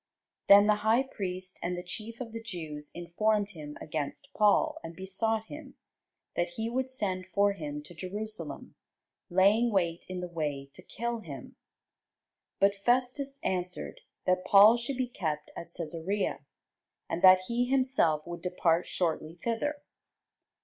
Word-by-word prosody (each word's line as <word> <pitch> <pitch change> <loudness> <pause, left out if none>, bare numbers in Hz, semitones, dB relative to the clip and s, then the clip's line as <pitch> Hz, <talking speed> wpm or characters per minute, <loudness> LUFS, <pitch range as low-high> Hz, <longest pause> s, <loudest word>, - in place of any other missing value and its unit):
Then 200 +1 +9
the 210 0 +4
high 220 +5 +3
priest 185 -7 -5
and 175 +1 -2
the 180 - -5
chief 220 +6 -6
of 240 -3 -6
the 230 0 -6
Jews 160 -9 -7
informed 205 +5 0
him 150 -5 -9
against 155 - -4
Paul, 300 +10 +3
and 165 - -7
besought 215 +4 -1
him, 295 +1 -10 0.6
that 175 0 -1
he 225 +1 -2
would 260 +1 -1
send 190 -8 -2
for 200 0 +4
him 150 -5 -6
to 160 - -11
Jerusalem, 205 +6 -6 0.6
laying 200 +6 +4
wait 170 -4 0
in 185 -1 -4
the 180 - -4
way 145 -5 -4
to - - -13
kill 235 +5 -4
him. 140 - -9 1.0
But 200 +1 +5
Festus 255 +3 +1
answered, 180 -1 -3 0.2
that 185 0 +2
Paul 205 +4 +8
should 240 +2 -3
be 255 -1 0
kept 155 -10 -3
at 170 - -7
Cæsarea, 170 +4 -2 0.7
and 170 - -3
that 185 -1 +8
he 235 +6 -1
himself 255 - +2
would 175 0 -7
depart 175 -2 +1
shortly 165 -2 -2
thither. 265 - -2
195 Hz, 150 wpm, -30 LUFS, 170-230 Hz, 1.0 s, Then